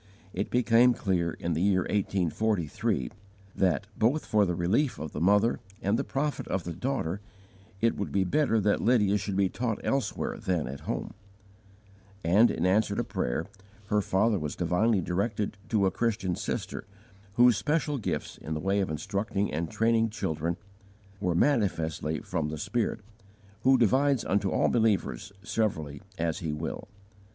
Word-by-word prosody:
It 100 +3 -2
became 120 0 +4
clear 90 -4 0
in 85 - -3
the 80 - -1
year 95 -1 +3
1843, 95 - 0 0.4
that, 95 +1 +1
both 125 +8 +1
for 105 -2 +3
the 90 - -1
relief 105 - +1
of 75 +1 -6
the 75 - -5
mother 105 +6 +3 0.2
and 100 +1 +1
the - - 0
profit 145 +2 -2
of 95 - -1
the 85 - -5
daughter, 105 -5 -2 0.6
it 115 0 +3
would 100 - -3
be 95 - +2
better 115 +4 +2
that 105 +1 +2
Lydia 105 -4 +3
should 100 0 -3
be 100 -1 +4
taught 115 +2 -2
elsewhere 135 -1 -1
than 90 - -1
at 70 +2 -6
home; - - -3 1.1
and 100 +8 +5
in 80 - -1
answer 100 +2 +2
to - - 0
prayer, - - -2 0.4
her 105 0 +3
father 100 +2 +2
was 75 -2 -4
divinely 95 +4 +2
directed 100 +4 -1
to 105 -3 +2
a 95 - +2
Christian 100 -6 -1
sister, - - -4 0.5
whose 120 +1 +6
special 150 -2 0
gifts 110 - -3
in 80 +2 -4
the - - -2
way 95 +4 +1
of 95 - 0
instructing 100 +6 -2
and 80 +1 -2
training 115 0 +2
children 85 -5 -2 0.6
were 90 -3 0
manifestly 80 - +1
from 80 -4 -2
the 80 - -4
Spirit, 110 +10 -1 0.6
who 130 +3 +5
divides 130 +3 +3
unto 100 0 +1
all - - +2
believers 110 -2 +1
severally 90 -8 -2 0.2
as 80 -1 -1
He 80 -3 -3
will. 75 +1 -5
100 Hz, 160 wpm, -28 LUFS, 85-115 Hz, 1.1 s, whose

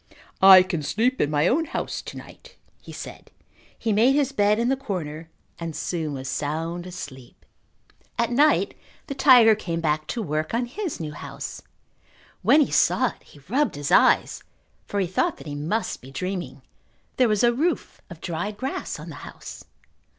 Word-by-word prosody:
"I 190 -1 +10
can 175 -4 -3
sleep 235 - 0
in 145 - +2
my 150 +2 +2
own 320 - +2
house - - -4
to - - -9
night," - - -13 0.3
he - - -11
said. - - -9 0.5
He 225 -2 -1
made 235 +6 +4
his 285 -2 +1
bed 210 -5 +2
in 235 +1 +1
the 270 - +3
corner 165 - -5 0.3
and 165 -2 -5
soon 160 -4 -3
was 130 -1 -6
sound 165 +6 -3
asleep. 145 -9 -10 0.7
At 235 0 0
night 290 +5 +3 0.3
the 275 - -5
tiger 250 -5 +7
came 170 -6 -3
back 155 -1 -1
to 230 +5 -3
work 155 +3 -2
on 240 +1 0
his 350 - -5
new 155 -2 -4
house. - - -7 0.8
When 305 - +5
he 285 - +1
saw - - +3
it - - -15
he 145 - -18
rubbed 275 - +1
his 145 -1 -4
eyes - - +4 0.4
for 205 - -2
he 190 - +2
thought 180 +1 0
that - - -12
he 145 - -6
must 160 +10 -2
be 130 - -12
dreaming. 180 +6 -5 0.5
There 250 -3 +4
was 210 0 +1
a 240 0 +5
roof 320 +7 -2
of 170 -3 -11
dried 205 +5 -4
grass 265 +4 -4
on - - -9
the - - -8
house. - - -10
190 Hz, 180 wpm, -24 LUFS, 155-240 Hz, 0.8 s, I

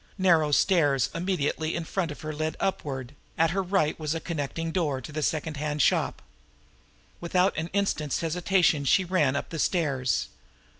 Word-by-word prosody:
Narrow 170 -6 +3
stairs 145 - +3
immediately 165 -3 -1
in 170 - -2
front 170 +1 -2
of 150 - -8
her 155 0 -4
led 155 +1 -3
upward; 140 -9 -3 0.2
at 165 0 +3
her 195 +2 0
right 180 -5 0
was 155 0 -2
a - - -1
connecting 165 0 -3
door 155 -7 0
to 130 - -9
the 155 +1 -3
secondhand 150 -1 -2
shop. - - +1 1.0
Without 180 +2 +1
an 160 +1 -2
instant's 175 -7 -1
hesitation 170 -2 +2
she 185 +7 +4
ran 155 -7 +2
up - - -3
the 165 - -5
stairs. 140 -8 0
160 Hz, 160 wpm, -27 LUFS, 150-180 Hz, 1.0 s, she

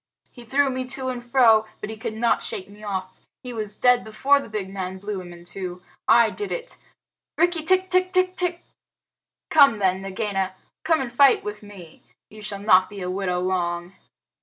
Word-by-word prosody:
"He 240 -2 -13
threw 275 +3 +2
me 255 0 -3
to 260 0 -2
and 245 -1 -5
fro, 235 -3 +5
but 215 - -6
he - - -6
could 220 0 -5
not 235 +1 +1
shake 185 - -3
me 205 +1 -16
off. 190 -2 -5 0.2
He 250 -1 -6
was 215 -2 -5
dead 245 +1 +4
before 265 +6 +2
the 275 - -9
big 210 -3 -4
man 190 -1 -5
blew 200 0 -5
him 175 -1 -10
in 175 0 -12
two. 180 0 -7 0.2
I 230 0 +5
did 415 - -4
it! - - -4 0.6
Rikki 350 -2 +2
tikki 375 +3 +2 0.2
tck 370 0 +1
tck! 355 -1 -1 0.9
Come 280 -7 +6
then, 190 -2 +1
Nagaina. 195 -1 -2 0.3
Come 320 -3 +2
and 245 -3 -5
fight 275 +1 +5
with 210 0 -6
me. 195 -6 -13 0.3
You 215 0 -12
shall 210 -1 -4
not 185 -3 +5
be 200 -2 -8
a 180 0 -3
widow 185 -2 -1
long." 175 -1 -2
215 Hz, 190 wpm, -24 LUFS, 190-260 Hz, 0.9 s, Come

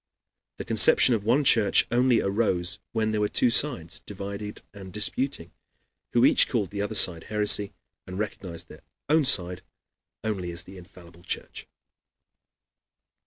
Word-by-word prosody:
The - - -7
conception 125 - +5
of 110 -3 -2
one 125 +7 +1
church 110 -6 +3
only 120 -1 +2
arose 100 -2 -1
when 110 -1 -1
there 105 -1 -2
were 105 - 0
two 125 - +1
sides 115 - 0
divided 100 +1 -8
and 95 -2 -11
disputing, 105 -1 -3 0.6
who - - +4
each - - +5
called 100 - -2
the 100 0 -4
other 105 +2 -4
side 85 -4 +4
heresy, 105 -1 +1 0.4
and 90 - -8
recognized 95 -5 -6
their - - -15 0.3
own 155 -1 +3
side 90 -9 +2 0.6
only 95 -5 -4
as 85 0 -4
the 95 +1 -14
infallible 85 -1 -17
church. 90 - -7
100 Hz, 145 wpm, -25 LUFS, 90-110 Hz, 0.6 s, conception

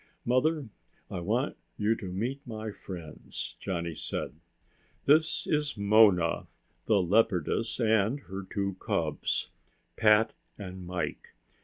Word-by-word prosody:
"Mother, 140 +3 +2 0.4
I - - -3
want 85 - 0 0.2
you 105 +2 +2
to 95 - -6
meet 115 +10 -2
my 110 -4 -5
friends," 85 -6 -7
Johnny 85 -3 -3
said. - - -4 0.7
"This 155 +2 +4
is 150 -4 0
Mona, 100 -4 +4 0.4
the 105 -3 +5
leopardess, 95 +3 +2
and 110 +3 +2
her 95 -5 -6
two 100 -2 -2
cubs, - - -1 0.5
Pat 105 +1 +5 0.2
and 95 -3 -7
Mike. 85 -4 -4
105 Hz, 115 wpm, -29 LUFS, 90-115 Hz, 0.7 s, the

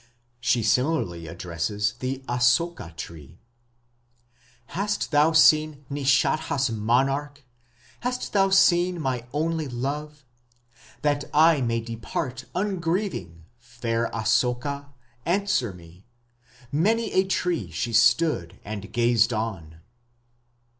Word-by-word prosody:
She 120 -1 +1
similarly 115 - 0
addresses 90 +5 -2
the 130 +1 -4
Asoka 125 - +1
tree: 80 -1 -9 1.4
"Hast 205 +1 -2
thou 150 +2 +4
seen 155 -2 +4
Nishadha's 140 -1 +1
monarch, 135 +6 0 0.6
hast 250 +1 -3
thou 195 -1 +4
seen 180 -2 +4
my 130 -5 -2
only 160 +1 -1
love?... 140 +3 -5 0.8
That 145 -1 +1
I 160 -1 +5
may 115 -1 0
depart 115 +3 -5
ungrieving, 180 - -2 0.2
fair 115 -1 -3
Asoka, 125 +6 0 0.4
answer 175 - 0
me...." 90 +2 -16 0.6
Many 220 +10 +1
a 190 - +4
tree 175 - -1
she 100 +8 -3
stood 120 - +3
and 100 -2 -6
gazed 120 -1 +3
on.... 95 -8 -4
130 Hz, 100 wpm, -25 LUFS, 115-160 Hz, 1.4 s, I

